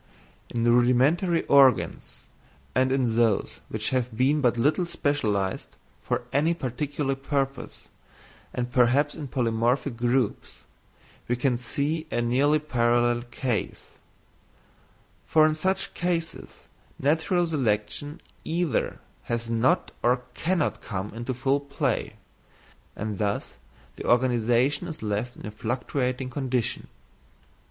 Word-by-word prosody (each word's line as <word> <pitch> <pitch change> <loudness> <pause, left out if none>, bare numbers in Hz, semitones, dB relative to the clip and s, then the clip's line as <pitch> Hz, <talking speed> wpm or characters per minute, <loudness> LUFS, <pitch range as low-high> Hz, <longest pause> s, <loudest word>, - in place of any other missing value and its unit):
In 115 -1 -2
rudimentary 125 +9 +3
organs, 135 -2 +3 0.5
and 130 0 +2
in 125 -4 +1
those 115 -4 +1
which - - -2
have 125 -3 -1
been 140 +4 +3
but 120 -3 +2
little 155 +9 +2
specialised 105 - -1 0.3
for - - -2
any 160 +4 +2
particular 140 0 -2
purpose, 135 0 -3 0.6
and 125 0 -3
perhaps 130 +4 +3
in 150 -3 -6
polymorphic 120 +1 0
groups, 120 -1 -1 0.7
we 120 - +1 0.2
see 150 +6 -2
a - - -1
nearly 130 +6 +3
parallel 120 -4 +1
case; 120 -2 -4 1.3
for 155 -1 +5
in 155 - +3
such 190 +5 -1
cases 170 -2 -3 0.3
natural 160 +5 +1
selection 145 +1 -1 0.2
either 165 -2 -1 0.3
has 115 0 -3
not 115 +3 +2
or 125 +1 +2
cannot 170 +2 0
come 100 -1 -5
into 120 +3 -4
full 135 +3 +1
play, 140 0 -2 0.8
and 105 -1 -4
thus 105 -1 -2 0.4
the - - -7
organisation 125 +5 +2
is 160 -9 -7
left 105 +3 -2
in - - -9
a 105 - -5
fluctuating 125 +3 -2
condition. 125 -3 -2
130 Hz, 115 wpm, -26 LUFS, 120-145 Hz, 1.3 s, for